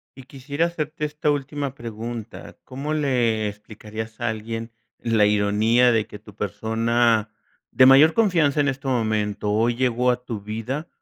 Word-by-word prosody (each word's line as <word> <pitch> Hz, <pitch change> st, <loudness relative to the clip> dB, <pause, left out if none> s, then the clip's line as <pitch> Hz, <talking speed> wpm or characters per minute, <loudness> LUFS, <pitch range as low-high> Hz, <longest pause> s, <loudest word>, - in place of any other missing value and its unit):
Y 135 Hz, -, -12 dB
quisiera 140 Hz, +4 st, -3 dB
hacerte 155 Hz, -3 st, -3 dB
esta 150 Hz, 0 st, -2 dB
última 145 Hz, -1 st, -3 dB
pregunta, 115 Hz, -1 st, -8 dB
¿cómo 140 Hz, +4 st, -5 dB
le 120 Hz, -7 st, +1 dB
explicarías 110 Hz, +1 st, -9 dB
a 120 Hz, -1 st, -1 dB
alguien 115 Hz, +1 st, -5 dB, 0.3 s
la 115 Hz, -3 st, +2 dB
ironía 105 Hz, +4 st, +3 dB
de 110 Hz, -2 st, +1 dB
que -, -, -10 dB
tu 105 Hz, -1 st, -16 dB
persona 110 Hz, +2 st, 0 dB, 0.4 s
de 130 Hz, -, +5 dB
mayor 140 Hz, +5 st, +7 dB
confianza 165 Hz, -9 st, +2 dB
en 145 Hz, -, +1 dB
este 135 Hz, 0 st, -5 dB
momento, 105 Hz, -4 st, -1 dB
hoy 115 Hz, +3 st, +1 dB
llegó 125 Hz, 0 st, +1 dB
a 125 Hz, 0 st, -1 dB
tu 115 Hz, -5 st, -5 dB
vida 115 Hz, -, -5 dB
120 Hz, 155 wpm, -23 LUFS, 110-135 Hz, 0.4 s, mayor